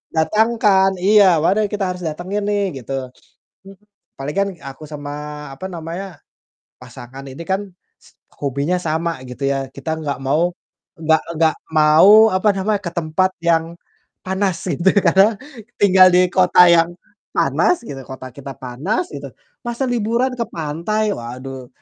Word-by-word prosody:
datangkan?" 210 +2 +3 0.2
Iya, 210 0 +6 0.2
"mana 190 +5 +2
yang 205 - -3
kita 200 -2 -2
harus 180 0 -5
datengin 185 +6 -4
nih?" 205 0 +1 0.2
Gitu. 130 +1 -7 1.3
Palingan, 180 +8 -2
eee, - - -18
aku 135 +2 -9
sama 150 0 -7
apa 185 - -7
namanya, 170 +1 -7 0.6
pasangan 125 +1 -11
ini 135 +5 -8
kan, 190 +1 0 0.8
hobinya 140 +5 -1
sama 165 -2 -2
gitu 130 +2 -4
ya. 135 -1 -2
Kita 160 +4 -4
nggak 145 -4 -3
mau, 160 +6 +1 0.5
nggak 160 0 +2
nggak 160 0 +2 0.2
mau 185 +9 +7
apa 185 +3 +1
namanya, 205 +1 0
ke 170 - -5
tempat 170 +3 0
yang 165 0 +1 0.5
panas 190 -1 -1
gitu 175 +3 +2 0.2
karena, 205 +3 +4 0.4
tinggal 185 -2 +7
di 180 0 +4
kota 180 -1 +4
yang 170 0 +4 0.5
panas 360 -9 +1
gitu, 135 -11 -7
kota 130 -1 -8
kita 140 -1 -8
panas 150 - -3
gitu, - - -7 0.4
"Masa 240 +3 -2
liburan 240 +2 0
ke 235 - 0
pantai!" 170 +8 -2
Waduh. 130 +2 -8
170 Hz, 140 wpm, -19 LUFS, 145-195 Hz, 1.3 s, mau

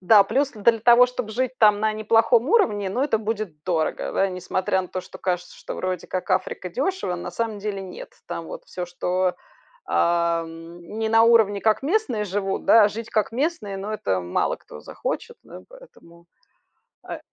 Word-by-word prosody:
Да, 200 +2 +7
плюс 275 +7 0
для 225 0 +2
того, 240 +2 +7
чтобы 250 -3 -5
жить 255 +3 -1
там 210 -2 +5
на 215 0 +1
неплохом 225 +4 +3
уровне, 210 - +2
ну, 245 +7 -1
это 275 -6 +2
будет 210 -8 -4
дорого, 165 -4 -1
да. 195 - +2
Несмотря 185 +1 -1
на 180 - -9
то, 185 - -4
что - - -12
кажется, 180 -1 -3
что - - -7
вроде 185 -1 -3
как 185 - -4
Африка- 180 - -1
дёшево, 275 - -2
на 175 - -6
самом 225 -3 -3
деле 200 -1 -4
нет. 185 -2 -9
Там 165 - -5
вот - - -8
всё, 180 -1 -5
что, 180 +1 -1 0.5
ам, 170 0 -1 0.2
не 220 0 0
на 225 0 +5
уровне, 220 -4 +4
как 220 +3 +2
местные 275 - 0
живут, 195 0 -3
да, 225 -2 +7
а - - +4
жить 225 +2 -7
как 215 +1 0
местные, 250 - -2
ну, 200 +2 -5
это 95 - -1
мало 90 0 -1
кто - - -13
захочет, - - -5
да, - - -12
поэтому 170 - -17 0.8
Э - - -5
210 Hz, 185 wpm, -23 LUFS, 180-230 Hz, 0.8 s, Да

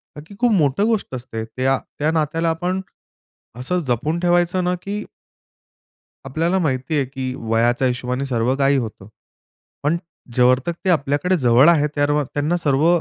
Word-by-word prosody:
का 150 - -8
की 200 - -13
खूप 240 +2 +2
मोठं 170 0 +2
गोष्ट 220 - -1
असते. 120 -3 -5
त्या, 130 +4 0 0.2
त्या, 155 +2 +1
नात्याला 165 +1 0
आपण 180 +3 -1 0.8
असं 180 +9 -1
जपून 150 +8 0
ठेवायचं 175 +1 +2
ना 180 0 +1
की 205 +1 -4 1.2
आपल्याला 165 +7 0
माहिती 135 -2 -1
आहे, 135 - +1
की 130 -1 -5
वयाच्या 120 +3 +1
हिशोबाने 125 +2 -2
सर्व 125 0 0
काही 140 0 +3
होतं. 110 -6 -5 0.8
पण 155 +4 +2 0.4
जोवर 125 0 +5
ते 170 +3 -3
आपल्याकडे 155 +3 +1
जवळ 125 +3 +5
आहेत, 150 -3 +3
तोवर 145 0 +2
त्यांना 150 +4 0
सर्व 150 -1 +2
145 Hz, 150 wpm, -21 LUFS, 130-170 Hz, 1.2 s, जोवर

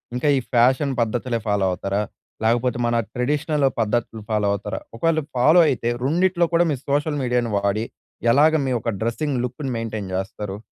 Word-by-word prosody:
ఇంకా 125 +4 -1
ఈ - - +2
fashion 130 +4 +3
పద్ధతులే 115 +1 -1
follow 105 -2 +1
అవుతారా? 100 +3 -2 0.4
లేకపోతే 120 +2 +1
మన 120 - +1 0.2
ట్రెడిషనల్ 145 +3 0
పద్ధతులు 115 0 -1
ఫాలో 105 -2 +1
అవుతారా? 100 - -4 0.2
ఒకవేళ 165 +4 +2 0.2
ఫాలో 155 +8 +6
అయితే 120 -3 -1
రెండిట్లో 175 +5 +2
కూడా 170 +1 +4
మీరు 135 -4 -3
సోషల్ 145 +1 0
మీడియాను 120 -2 0
వాడి 100 +2 0 0.5
ఎలాగ 150 +5 +5
మీ 130 - -1
యొక్క 115 0 -2
డ్రెస్సింగ్ 125 +4 -1
లుక్‌ని 130 +2 -5
మెయింటైన్ 110 -4 -4
చేస్తారు? 95 +1 -4
120 Hz, 155 wpm, -22 LUFS, 110-145 Hz, 0.5 s, ఫాలో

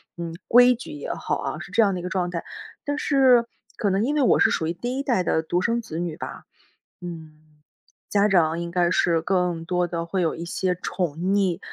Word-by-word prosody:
嗯， 170 -1 -5
规 245 +1 +7
矩 250 +6 -8
也 300 - -5
好 - - -2
啊， - - -4
是 - - -9
这 230 - +5
样 200 -2 +2
的 180 - -3
一 - - -6
个 - - -3
状 185 -1 -1
态。 170 -1 -5 0.4
但 290 0 -2
是 260 -5 +4 0.3
可 205 - 0
能 195 +3 +1
因 290 +4 0
为 295 - +2
我 255 - +4
是 - - +5
属 160 - -1
于 165 - -1
第 245 +8 -4
1 275 - -2
代 240 -9 +1
的 160 -2 0
独 175 +2 0
生 235 +4 0
子 170 -7 -6
女 175 -3 -3
吧， - - -8 0.6
嗯， 155 -3 -10 0.5
家 205 0 +3
长 165 -4 +3
应 170 0 -5
该 175 -1 +2
是 170 -2 +2
更 180 -2 0
多 180 +1 0
的 170 -1 -3
会 185 +2 -2
有 165 - +1
一 170 - -6
些 185 +1 -1
宠 175 -5 -2
溺， 190 -1 +1
180 Hz, 240 characters per minute, -24 LUFS, 170-225 Hz, 0.6 s, 规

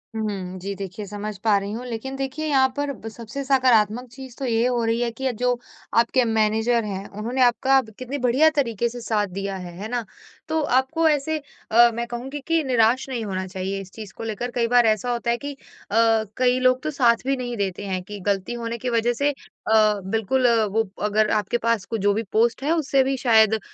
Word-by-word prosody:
हुँ, 195 -4 -4
जी, 195 +2 -4
देखिए 195 +1 -6
समझ 205 +1 -6
पा 215 -3 +4
रही 200 +1 -3
हूँ 240 +3 -5
लेकिन 250 +3 -5
देखिए 270 +3 -4
यहाँ 270 -3 +4
पर 285 0 -1
ब 225 -2 -10
सबसे 230 +5 -7
सकारात्मक 250 -3 +3
चीज़ 260 -2 -11
तो 270 - -2
ये 230 -1 +1
हो 245 -2 0
रही 225 +1 +1
है 240 - +1
कि 265 +4 -7
अ, - - +1
जो 245 +1 0 0.4
आपके 235 +2 +3
मैनेजर 220 +1 +2
हैं, 195 -1 -5
उन्होंने 230 +6 -3
आपका 260 +2 +4
ब 220 -3 -14
कितनी 255 +3 -4
बढ़िया 260 +4 +4
तरीके 235 -5 0
से 245 +1 -8
साथ 215 -3 0
दिया 195 +1 -4
है, 180 -2 -7
है 205 +3 -5
ना? 240 -1 -2 0.4
तो 320 0 0
आपको 290 +4 +2
ऐसे 305 +1 0 0.3
अ, 235 +2 +7
मैं 235 +1 -2
कहूँगी 250 +4 -5
कि 330 -1 +2
निराश 250 0 +2
नहीं 245 -3 -3
होना 190 -2 -3
चाहिए 190 +1 -4
इस 190 -1 -12
चीज़ 210 -2 -10
को - - -6
लेकर 225 +2 -4
कई 235 -1 +2
बार 245 0 +4
ऐसा 220 +2 +1
होता 235 0 -1
है 235 - 0
कि 285 +3 -6
अ, 225 -4 0
कई 250 0 +3
लोग 255 0 +3
तो 310 - -2
साथ 240 -4 +2
भी 270 0 +1
नहीं 245 -2 -4
देते 200 -1 -3
हैं 185 -1 -2
कि 205 +2 -8
गलती 195 +2 0
होने 235 0 -4
की 250 +2 -3
वजह 235 0 +1
से 280 +5 +1
अ, 265 -5 -6 0.3
बिल्कुल 225 +6 0
अ, 230 -2 +3
वो 215 +1 -1
अगर 210 +1 +2
आपके 215 +2 +1
पास 230 -5 +1
क - - +1
जो 205 0 +4
भी 220 +3 -1
पोस्ट 235 +4 +2
है 300 - +1
उसे 275 -4 +2
भी 270 +1 0
शायद 220 -3 +4
235 Hz, 225 wpm, -23 LUFS, 215-255 Hz, 0.4 s, अ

